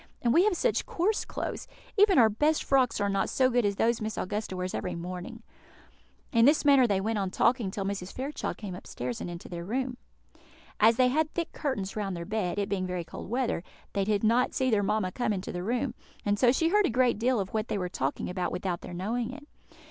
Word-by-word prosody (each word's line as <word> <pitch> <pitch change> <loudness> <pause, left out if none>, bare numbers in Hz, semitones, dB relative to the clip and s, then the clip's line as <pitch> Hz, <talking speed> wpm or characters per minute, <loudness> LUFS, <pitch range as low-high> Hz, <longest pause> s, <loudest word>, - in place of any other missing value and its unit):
and 235 -1 +3
we 345 +6 +5
have 415 -5 +2
such - - +1
coarse 435 -2 0
clothes! - - -5 0.3
Even 405 -3 +5
our 230 - +8
best 295 +9 +1
frocks 265 -3 +2
are 205 - +1
not 195 0 0
so 260 -1 +2
good 245 0 +2
as 200 - -1
those 230 +2 +1
Miss 215 0 -3
Augusta 205 -1 -3
wears 185 0 -3
every 180 - -3
morning." 180 +1 -7 0.9
In 230 -1 +5
this 295 +2 +4
manner 275 -3 +6
they 200 -3 +1
went 215 +2 -1
on 195 -1 -1
talking 235 +2 +2
till 195 +1 -4
Mrs. 195 -2 -3
Fairchild 275 +4 -4
came 205 -4 -6
upstairs 125 -8 -5
and - - -4
into 170 0 -8
their 170 -1 -6
room. 250 +5 -2 0.8
As 225 +2 +6
they 250 +1 +4
had 310 +4 +1
thick 340 -1 -2
curtains 210 -10 -3
round 195 -4 -2
their 170 - -5
bed, 205 -3 -2
it 200 -1 0
being 190 -2 -1
very 180 -1 -3
cold 170 - -9
weather, 240 -6 0 0.3
they 200 - +1
did 205 +1 0
not 235 +3 +3
see 260 -2 +1
their 210 -2 +3
mamma 200 -2 0
come 245 0 -1
into 190 -1 -4
the 175 - -4
room, 240 +5 -1 0.3
and 205 0 +1
so 245 -2 +6
she 325 +5 +2
heard 415 +1 +4
a - - -1
great 245 -2 +2
deal 245 0 +2
of 190 -1 -4
what 215 0 -1
they - - -1
were 180 -2 -2
talking 140 -5 -2
about 180 0 -2
without 180 -1 -3
their 175 - -8
knowing 225 +6 -2
it. 290 +2 -11
220 Hz, 230 wpm, -28 LUFS, 190-255 Hz, 0.9 s, our